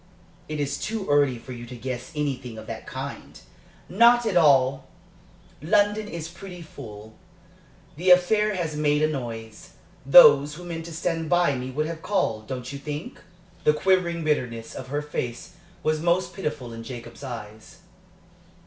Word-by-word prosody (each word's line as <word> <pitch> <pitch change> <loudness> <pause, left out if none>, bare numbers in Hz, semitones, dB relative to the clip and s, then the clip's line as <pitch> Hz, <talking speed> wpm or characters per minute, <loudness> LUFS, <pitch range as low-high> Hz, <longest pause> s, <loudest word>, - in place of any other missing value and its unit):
"It 155 -1 -3
is 140 0 -2
too 215 -2 -3
early 145 -3 +3
for 130 - -11
you 120 -1 -8
to 125 - -8
guess 125 +2 -5
anything 130 -6 -3
of 110 - -9
that - - -7
kind." - - -7 0.5
"Not 235 +5 +5
at 215 -4 0
all! 135 -5 +4 0.7
London 205 +6 +2
is 165 -4 -6
pretty 175 0 -10
full. 110 -8 -11 0.8
The 180 +3 0
affair 210 +4 +5
has 165 -4 -2
made 150 0 +2
a - - +5
noise. 115 -6 -6 0.3
Those 145 0 +8
who 180 - -10
meant 165 -2 -6
to 170 - -8
stand 165 -1 -2
by 175 -4 +3
me 130 0 -4
would 150 +4 -1
have 165 0 -5
called, 110 - -1
don't 130 +1 -5
you 140 - -6
think?" 150 +2 -6 0.4
The 150 - +5
quivering 175 -1 +1
bitterness 125 -7 -1
of 130 - -7
her 145 +3 -2
face 125 0 -5 0.3
was 155 0 +1
most 175 +1 +1
pitiful 140 -10 -4
in 115 - -7
Jacob's 120 +3 -9
eyes. 110 -4 -9
150 Hz, 160 wpm, -25 LUFS, 125-175 Hz, 0.8 s, Those